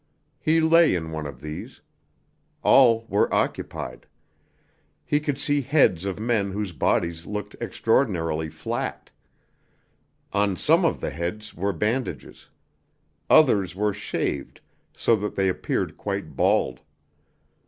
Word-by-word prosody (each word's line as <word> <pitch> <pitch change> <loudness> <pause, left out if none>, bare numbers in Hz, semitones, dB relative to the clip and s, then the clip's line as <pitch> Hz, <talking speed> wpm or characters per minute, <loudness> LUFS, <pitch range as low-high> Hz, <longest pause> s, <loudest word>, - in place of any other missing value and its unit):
He 160 +1 +2
lay 165 - +5
in 80 -2 -4
one 80 -2 -4
of 65 -3 -10
these. 75 +1 -8 0.8
All 115 -4 +5
were 100 - +1
occupied. - - -3 1.0
He 145 - +2
could 145 -3 -2
see 145 0 +1
heads 130 - +2
of 100 0 -3
men 110 -3 0
whose 100 0 -3
bodies 85 +2 -1
looked 105 0 -5
extraordinarily 90 - 0
flat. - - -5 1.2
On 100 -1 +1
some - - +3
of - - 0
the - - -2
heads 85 +8 -5
were 100 +4 -1
bandages. 110 +8 -3 0.8
Others 100 - +4
were 105 +1 0
shaved, 100 - -3 0.4
so 115 - +3
that 105 +1 -4
they 95 -1 +1
appeared 95 - -2
quite - - -4
bald. - - +1
105 Hz, 120 wpm, -24 LUFS, 85-120 Hz, 1.2 s, lay